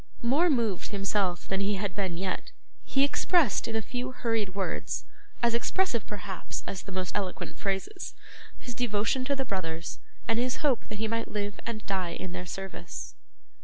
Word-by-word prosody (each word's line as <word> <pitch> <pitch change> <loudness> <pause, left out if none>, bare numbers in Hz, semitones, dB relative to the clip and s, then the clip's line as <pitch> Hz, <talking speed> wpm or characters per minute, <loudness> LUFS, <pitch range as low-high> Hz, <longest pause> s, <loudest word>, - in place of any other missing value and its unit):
More 290 +9 +5
moved 230 - +2
himself 195 -3 +1
than 195 - +1
he 200 +1 +3
had 195 -1 -1
been 190 -4 0
yet, 185 0 -1 0.3
he 270 - +3
expressed 295 - +4
in 225 - -1
a 220 - +1
few 250 +4 -2
hurried 225 -6 0
words 195 -2 -1 0.4
as 235 -1 +5
expressive, 235 - +2
perhaps, 195 -3 -4
as 190 - -3
the 195 - -8
most 185 -2 -2
eloquent 190 -3 -1
phrases 200 - -1 0.4
his 245 - -6
devotion 235 +2 +2
to 280 +1 +2
the 270 -1 0
brothers, 170 -5 -2 0.3
and 225 0 +3
his 255 +4 0
hope 265 -5 +3
that 215 - -3
he 220 +1 +1
might 230 +1 0
live 205 -1 -2
and 220 -2 -3
die 185 -3 0
in 185 - -4
their 180 0 -4
service. 195 +2 -5
210 Hz, 175 wpm, -30 LUFS, 190-240 Hz, 0.4 s, More